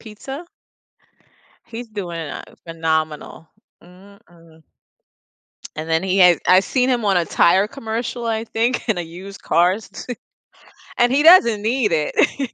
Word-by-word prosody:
pizza? 265 +8 -9 1.2
He's 230 0 -8
doing, 180 -6 -6
uh, 150 -3 -7 0.2
phenomenal. 160 -1 -3 0.3
Mm, 190 +3 -18
mm. 165 -2 -21 1.1
And 155 +1 -6
then 160 +1 +1
he 190 0 0
had 180 -2 +6
I've 185 +1 +5
seen 255 -1 0
him 240 -4 0
on 195 -2 +2
a 170 - +2
tire 190 +5 +3
commercial, 235 -1 -5
I 225 0 -2
think, 235 +2 -2
in 205 -5 0
a - - -2
used 185 +4 -11
cars, 180 +6 0 0.9
and 240 0 +3
he 285 +3 +2
doesn't 235 - +6
need 225 -2 0
it. 165 - 0
200 Hz, 140 wpm, -20 LUFS, 170-235 Hz, 1.2 s, had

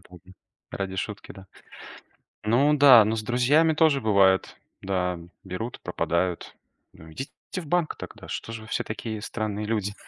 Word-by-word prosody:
да. 90 +1 -15 0.4
Ради 95 -1 -4
шутки, 100 +1 -5
да. 95 0 -13 1.0
Ну 140 +7 +3
да, 130 -6 +8
но 110 +1 -1
с 110 - -3
друзьями 135 +8 +3
тоже 155 -3 +3
бывает: 100 -4 +3 0.3
да, 90 -2 -1 0.3
берут, 95 +6 -6
пропадают. 85 +1 -2 0.4
Ну, 80 0 -14
идите 135 - -7 0.2
в 175 -4 -4
банк 175 0 0
тогда, - - -10
что 115 - -5
же 110 -1 -7
вы 110 - -13
все - - -2
такие 110 0 -5
странные 105 -2 -4
люди? 105 -2 -2
110 Hz, 155 wpm, -25 LUFS, 95-125 Hz, 1.0 s, да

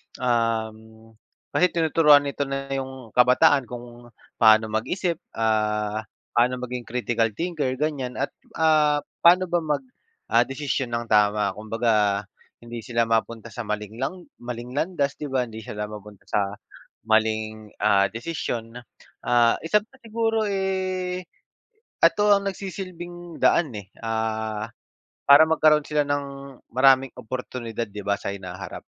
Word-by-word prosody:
Um, 110 -2 -2 0.4
kasi 180 - +4
tinuturuan 155 -3 +5
nito 140 0 -3
na 135 0 -4
yung 130 -3 -5
kabataan, 125 +2 +4
kung 120 0 -10 0.3
paano 110 -1 +6
mag-isip, 165 - -1 0.2
ah, 105 -1 0 0.2
paano 125 +1 +3
maging 125 -1 -5
critical 115 -1 0
thinker, 165 -6 -2
ganyan, 135 -3 -2
at, 140 - -2 0.2
ah, 155 -2 +3 0.2
paano 180 +2 +6
ba 175 - +3
mag, 155 - -1 0.5
ah, - - +4
desisyon 135 -1 -2
nang 120 - -2
tama. 105 0 +3
Kumbaga, 105 -2 0 0.4
hindi 120 0 -7
sila 115 +1 0
mapunta 115 0 -1
sa 120 -3 -6
maling 105 +2 -4
lang 175 +7 -3 0.2
maling 120 0 -6
landas, 145 -1 -1
'di 150 - -4
ba? 130 -2 0
Hindi 110 -2 -8
sila 105 -1 -6
mapunta 105 -1 -11
sa 100 0 0 0.5
maling, 110 -1 0
ah, 100 0 +4
desisyon. 115 -1 -5 0.5
Ah, 120 -1 +4
isa 210 +6 +1
pa 260 +4 -23
siguro, 225 -2 0
eh, 185 -2 -2 0.8
ito 210 0 +4
ang 200 0 0
nagsisilbing 175 -3 -8
daan, 155 -7 +3
eh, 100 -2 -10
ah, 110 -1 -2 0.6
para 145 +3 +9
magkaroon 155 -2 +4
sila 150 -1 +2
ng 140 -2 -4
maraming 130 +1 +5
oportunidad 120 -2 -5
'di 105 0 -8
ba, 100 - +2
sa - - -5
hinaharap. 95 0 -8
125 Hz, 130 wpm, -24 LUFS, 110-150 Hz, 0.8 s, para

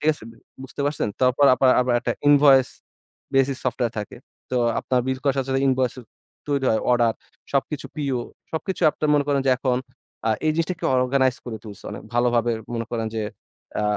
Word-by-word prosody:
ঠিক 155 - 0
আছে? 110 - -13 0.4
বুঝতে 135 - -8
পারছেন? 145 -6 -1
তারপর 130 +2 +4
আপার 130 +1 +3
আবার 125 -1 +1
একটা - - -1 0.2
ইনভয়েস 140 -2 +6 0.7
বেসিস 135 0 +2
সফটওয়্যার 120 -1 -1
থাকে। 105 - -8 0.3
তো 130 - 0 0.2
আপনার 125 -1 +1
বিল 130 0 -1
করার 140 -1 +2
সাথে 135 0 -2
সাথে 135 +1 +1
ইনভয়েন্স 130 -1 +1
ও - - -13 0.5
তৈরি 140 -2 0
হয় 110 - +2
অর্ডার 120 -2 +3 0.4
সবকিছু 140 +1 -1
পিও 140 -5 -1 0.3
সবকিছু 180 +4 -3
আপনার 155 - -2
মনে 145 -1 +3
করেন 140 -1 +2
যে - - +5
এখন 125 -2 +1 0.5
আ - - +3 0.2
এই 155 - +3
জিনিসটাকে 170 +2 -2
অর্গানাইজ 130 0 +2
করে 115 -2 -4
তুলছে। 105 -2 -11
অনেক - - -8
ভালোভাবে 120 -1 +2 0.2
মনে 115 -1 -3
করেন 115 -2 -2
যে 110 - -1 0.6
আ - - 0
130 Hz, 185 wpm, -23 LUFS, 120-140 Hz, 0.7 s, ইনভয়েস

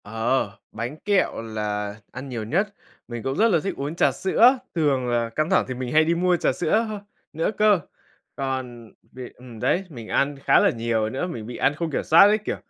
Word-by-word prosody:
Ờ, 115 +1 -1 0.2
bánh 120 +7 -5
kẹo 195 - +1
là 105 -2 -4 0.2
ăn 130 +2 -8
nhiều 120 -3 -4
nhất, 195 - -1 0.3
mình 120 -2 -6
cũng 135 0 -2
rất 220 +3 +4
là 175 -6 +3
thích 195 - -2
uống 145 +4 -4
trà - - +3
sữa. 235 +7 +4 0.2
Thường 140 -6 +1
là 120 -1 0
căng 155 +7 -1
thẳng - - +3
thì 130 - -3
mình 125 -1 -5
hay 155 +1 +5
đi 170 +1 +1
mua 180 +1 +2
trà - - +1
sữa 180 - +1
h - - -4 0.4
nữa 165 - +1
cơ. 210 -3 +4 0.6
Còn 130 -4 -5 0.2
việc 125 -1 -10
ừm 125 -3 -12
đấy, 185 - +1
mình 120 -8 -9
ăn 140 +4 0
khá - - +4
là - - +4
nhiều 115 -2 -1
nữa, 135 +10 -3
mình 115 -11 -6
bị 120 - -7
ăn 135 +2 +1
không 165 0 -3
kiểm - - -1
soát 160 - +6
ấy, 210 +1 +3
kiểu, 215 - -4
135 Hz, 220 wpm, -23 LUFS, 115-170 Hz, 0.6 s, soát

